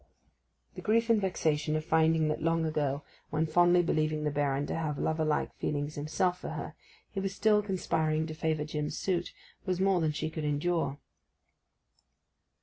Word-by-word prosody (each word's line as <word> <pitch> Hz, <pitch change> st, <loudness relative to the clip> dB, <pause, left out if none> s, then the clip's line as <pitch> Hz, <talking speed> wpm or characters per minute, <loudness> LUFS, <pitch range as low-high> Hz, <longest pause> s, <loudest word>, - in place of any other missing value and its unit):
The -, -, -8 dB
grief 230 Hz, +2 st, +2 dB
and 220 Hz, -2 st, +4 dB
vexation 155 Hz, -5 st, 0 dB
of 155 Hz, 0 st, -2 dB
finding 160 Hz, -1 st, +3 dB
that 155 Hz, -, -2 dB
long 165 Hz, 0 st, +1 dB
ago, 145 Hz, -2 st, -1 dB, 0.3 s
when 155 Hz, +1 st, +1 dB
fondly 175 Hz, +2 st, +4 dB
believing 155 Hz, -2 st, 0 dB
the 150 Hz, -, 0 dB
Baron 140 Hz, -1 st, 0 dB
to -, -, -3 dB
have 155 Hz, -3 st, -2 dB
lover 160 Hz, +2 st, 0 dB
like 155 Hz, -1 st, 0 dB
feelings 145 Hz, 0 st, -2 dB
himself 165 Hz, +5 st, 0 dB
for -, -, -6 dB
her, -, -, -5 dB, 0.4 s
he 195 Hz, -, -3 dB
was 195 Hz, 0 st, -3 dB
still 210 Hz, -1 st, +4 dB
conspiring 160 Hz, -5 st, 0 dB
to 160 Hz, -, -5 dB
favour 155 Hz, -1 st, -1 dB
Jim's 150 Hz, -1 st, -3 dB
suit, 175 Hz, -2 st, -1 dB, 0.3 s
was 185 Hz, -2 st, -1 dB
more 190 Hz, -2 st, +3 dB
than 155 Hz, -1 st, +2 dB
she 155 Hz, +1 st, -3 dB
could 155 Hz, -1 st, -4 dB
endure. 150 Hz, 0 st, 0 dB
160 Hz, 170 wpm, -30 LUFS, 150-175 Hz, 0.4 s, and